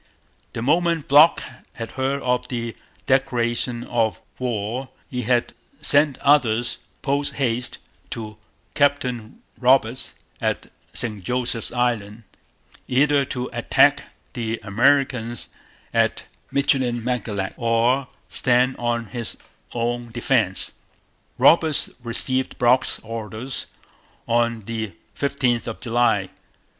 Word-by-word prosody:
The 115 - -4
moment 165 +2 +2
Brock 150 +4 +6 0.3
had 115 -1 -6
heard 135 +1 -1
of 125 0 0
the 120 -2 -4 0.3
declaration 120 -2 0
of 115 -3 0 0.2
war 120 +1 -2 0.2
he 125 -1 -2
had 120 +1 +1 0.3
sent 145 -2 +5
orders 120 -5 +3 0.2
post 140 0 +1
haste 125 -2 0 0.3
to 110 -2 -6 0.4
Captain 125 -6 0 0.2
Roberts 130 -1 +2 0.3
at - - -2 0.2
St 105 -5 -2
Joseph's 125 +2 -1
Island, 115 -3 -1 0.6
either 140 +2 +3
to 125 -1 -3
attack - - +4 0.3
the 115 -1 -3
Americans 120 +1 +1 0.4
at - - +2 0.3
Michilimackinac 120 -7 0
or 120 +3 +2 0.2
stand 125 +1 +2
on 120 -1 -1
his 115 +3 -5 0.3
own 120 0 -2
defence. 110 -5 +1 0.7
Roberts 160 -3 +4
received 130 +2 0
Brock's 125 +1 +3
orders 115 +3 -5 0.6
on 115 -1 +1
the 110 -2 -4 0.2
15th 130 -4 0
of 115 - -5
July. 120 0 +1
120 Hz, 100 wpm, -23 LUFS, 115-130 Hz, 0.7 s, Brock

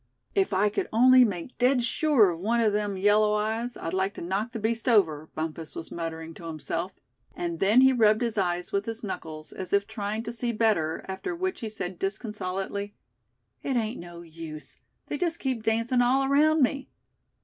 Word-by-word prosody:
"If 390 -1 +2
I 195 +2 +3
could 205 - -2
only 255 +3 +7
make 200 0 -3
dead 250 0 +3
sure 240 - +3
of 165 - -6
one 225 +6 +1
of 220 -3 +3
them 205 -2 -1
yellow 210 +2 +4
eyes, 225 +3 -2
I'd 165 - -5
like 190 +1 0
to - - -7
knock 195 +7 -2
the 235 - -5
beast 225 +3 -1
over," 160 -9 +3
Bumpus 160 0 -5
was 165 - -7
muttering 165 -1 -5
to 170 - -11
himself; 165 +3 -4 0.4
and 170 -1 -3
then 210 +6 +5
he 265 0 +6
rubbed 215 -2 +4
his 230 -2 -1
eyes 180 -3 -1
with 200 +1 0
his 225 0 -4
knuckles, 155 -6 -6
as 190 - -7
if 200 0 +3
trying 215 0 -4
to 230 +1 -5
see 235 0 -2
better, 210 -8 +1
after 195 - -4
which 370 +2 -2
he 225 - -4
said 185 -4 -5
disconsolately: 200 -1 -3 0.7
"It 270 - -2
ain't 230 0 -1
no 170 0 -9
use, 160 -3 -9 0.3
they 290 - -4
just 335 -2 0
keep 260 -4 -2
dancin' 230 +3 +1
all 260 +3 +3
around 300 +2 +4
me. 270 +2 -1
210 Hz, 195 wpm, -27 LUFS, 180-240 Hz, 0.7 s, only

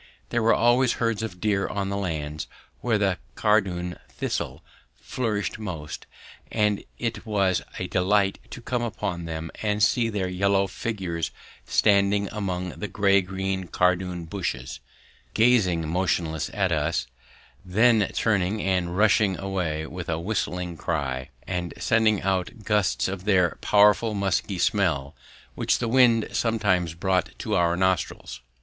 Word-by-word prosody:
There 120 - 0
were 115 +1 +4
always 120 +1 +4
herds 115 -2 -1
of 105 -5 -5
deer 100 -1 +1
on 100 -1 -2
the 100 - -2
lands 80 -6 -3 0.3
where 115 -3 +1
the 95 -3 +1 0.2
cardoon 95 -5 +1
thistle - - -4 0.4
flourished 110 -4 -2
most, 85 -8 -6 0.4
and 105 -2 +1
it 115 -2 -3
was 100 -5 +1 0.2
a - - -3
delight 95 +1 +1
to 120 - -9
come 125 0 -1
upon 100 -7 -3
them 80 0 -5
and 105 -1 0
to 105 - +6
see 115 0 +1
their 100 -4 -1
yellow 100 +2 +2
figures 95 -4 -3 0.4
standing 100 -1 +3
among 90 -4 -3
the 105 - -6
grey 100 0 +3
green 95 0 -3
cardoon 90 -1 0
bushes, 80 -8 -4 0.6
gazing 105 -9 +3
motionless 80 -2 -1
at 95 -3 0
us, 80 0 0 0.6
then 110 +3 +3
turning 105 -1 +1
and 90 -3 0
rushing 105 -2 +3
away 90 -6 -2
with 85 +1 -7
a 80 - 0
whistling 90 -2 -2
cry, 65 -7 -2 0.2
and 90 -2 -3
sending 110 -3 +2
out 95 +2 -1
gusts 105 -2 +1
of 95 0 -5
their 90 -4 +2
powerful 105 +2 +4
musky 100 0 0
smell, 85 -9 +1 0.4
which - - +1
the 120 - -2
wind 115 -2 +4
sometimes 95 -7 +1
brought 95 0 0
to - - -3
our 85 0 +2
nostrils. 95 -9 -1
95 Hz, 140 wpm, -25 LUFS, 90-105 Hz, 0.6 s, to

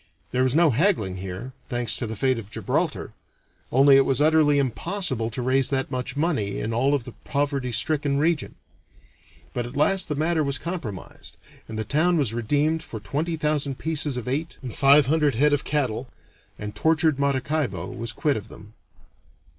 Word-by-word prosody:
There 130 - +1
was 130 +1 +2
no 165 -2 +5
haggling 115 - +1
here, 95 +7 -6 0.2
thanks 120 -3 +1
to 120 - -3
the 110 - -5
fate 130 +2 +1
of 105 -3 -10
Gibraltar; - - -2 0.6
only 135 +2 +6
it 135 - +6
was 135 -2 0
utterly 150 -1 +4
impossible 135 - -1
to 125 +2 -4
raise 130 +1 +2
that 135 -2 -1
much 125 +1 -4
money 140 - -1
in 115 - -3
all 135 +5 +2
of 135 - -2
the 125 - -9
poverty 140 -3 -1
stricken 145 +2 +1
region. 160 +1 0 1.0
But 120 -1 -2
at 120 - -10
last 185 +5 +2
the 150 - -1
matter 160 +2 +1
was 140 -1 -1
compromised, 165 - -7 0.3
and 110 - -6
the 110 - -1
town 160 - +2
was 135 -8 +1
redeemed 145 +7 0
for 115 - -8
twenty 155 +10 -3
thousand 150 -3 -1
pieces 150 -4 -1
of 125 - -5
eight 150 +6 -3
and 125 - -6
five 140 +1 +6
hundred 150 -1 +2
head 145 +5 +3
of 145 - +1
cattle, 130 -4 -1 0.5
and 105 0 -6
tortured 160 -1 +2
Maracaibo 140 +1 -1
was 115 0 -4
quit 145 +3 0
of 105 0 -7
them. 105 -1 -14
140 Hz, 180 wpm, -24 LUFS, 120-150 Hz, 1.0 s, only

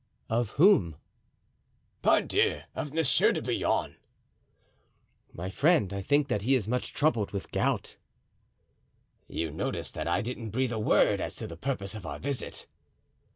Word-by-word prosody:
"Of 115 -1 +1
whom?" 140 - +5 1.1
"Pardieu! - - +2
of 145 - -4
Monsieur 160 -2 +3
de - - -1
Bouillon." - - -1 1.3
"My 90 +3 -6
friend, 140 - +3
I 100 - -3
think 145 +7 +2
that 120 -6 -1
he 130 +6 +3
is 110 -6 -1
much 125 +2 -1
troubled 145 -9 +1
with 100 - -6
gout." - - -1 1.3
"You 80 -2 -3
noticed 80 - -4
that - - -4
I 85 +3 +1
didn't 115 0 -5
breathe 130 +3 0
a 110 - -2
word 105 - +3
as - - -4
to - - -5
the 85 - -7
purpose 100 -1 -3
of 105 -6 -8
our 75 -1 -5
visit?" 140 - -4
115 Hz, 150 wpm, -29 LUFS, 100-135 Hz, 1.3 s, whom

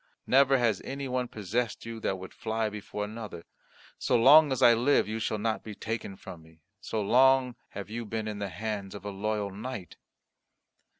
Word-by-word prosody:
Never 135 +1 +5
has 115 -5 +1
any 135 +1 -5
one 125 -1 -1
possessed 110 +2 -3
you 115 0 -6
that 95 -3 -1
would 95 0 -10
fly 110 -1 -2
before 105 0 -5
another. 105 -5 -8 0.6
So 125 - +1
long 145 +5 +7
as 130 - 0
I 120 - +8
live, 125 +3 +3
you 110 +1 -3
shall 110 -1 -1
not 110 -1 -1
be 105 -2 -8
taken 110 -3 -4
from 85 -3 -10
me, 80 0 -20 0.2
so 105 +2 -3
long 130 +3 +4 0.2
have 100 - -7
you 115 +3 -5
been 110 0 -4
in 105 -1 -4
the 100 -1 -3
hands 100 +1 -4
of 100 - -9
a 100 - -3
loyal 105 0 -2
knight." 105 -2 -7
110 Hz, 190 wpm, -29 LUFS, 100-125 Hz, 0.6 s, I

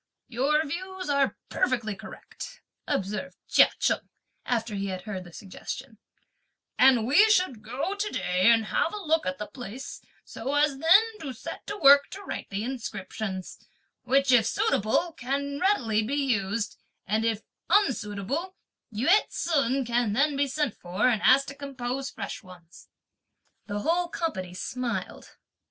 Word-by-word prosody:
"Your 285 +6 +2
views 370 +2 -4
are 280 -1 +2
perfectly 235 -4 0
correct," 485 - -10 0.2
observed 210 +8 -2
Chia - - +6
Cheng, - - 0 0.4
after 230 -3 -1
he 200 0 -2
had 185 -1 -5
heard 195 -4 -5
their 175 - -12
suggestion; 220 +6 -8 0.8
"and 255 -4 +6
we 330 - +6
should 360 - +2
go 250 - -3
to 410 +1 -2
day 180 - +2
and 225 -1 +4
have 330 - 0
a 410 -3 -7
look 320 -4 +2
at 185 0 -2
the 210 - -4
place 245 +2 -8 0.2
so 270 +5 -4
as 290 -2 +2
then 335 +8 +7 0.2
to 280 -7 -5
set 225 - -8
to 415 - -4
work 280 -4 +7
to 400 +1 -9
write - - -6
the 200 +1 -3
inscriptions; 215 -5 -5 0.4
which, 270 +2 +2
if 230 -3 +5
suitable, 225 - +1
can 280 +1 -3
readily 245 - +2
be 235 +6 -2
used; 230 -6 -1 0.3
and, 215 +3 0
if 225 -1 0 0.3
unsuitable, 275 - 0 0.4
Yü 225 +6 -2 0.2
ts'un 275 -5 0
can 235 -2 +1
then 280 +5 +2
be 280 0 +1
sent 285 -3 -1
for, 180 +6 0
and 220 -4 +1
asked 275 +2 +5
to - - -7
compose 275 -1 -4
fresh 200 - -6
ones." 180 -4 -16 0.8
The 205 -1 -3
whole 345 +7 +1
company 185 - -3
smiled. 250 +5 -4
255 Hz, 150 wpm, -27 LUFS, 215-290 Hz, 0.8 s, then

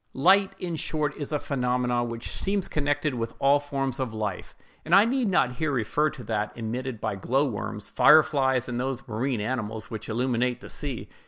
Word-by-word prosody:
Light, 190 +7 +4
in 170 -3 -4
short, 150 -1 -1
is 145 -1 -6
a 150 - +1
phenomenon 125 -3 0
which 115 0 -6
seems 195 -1 -1
connected 145 0 0
with 115 -2 -4
all 140 +1 +4
forms 135 -2 -3
of 120 -4 -3
life; 105 -4 -4 0.3
and - - +4
I 200 +2 +7
need 250 0 +1
not 130 -10 +2
here 155 0 0
refer 135 +5 +1
to 125 - -10
that 105 -1 -2
emitted 120 +1 -4
by 110 -2 -2
glow 130 +9 +1
worms, 105 -4 -4
fire 155 +3 +7
flies, 130 -4 +1
and 120 -1 -3
those 130 +1 -3
marine 120 +1 -1
animals 110 -1 -3
which 110 0 -6
illuminate 125 +1 0
the - - -11
sea. 140 -5 -5
130 Hz, 190 wpm, -26 LUFS, 115-145 Hz, 0.3 s, I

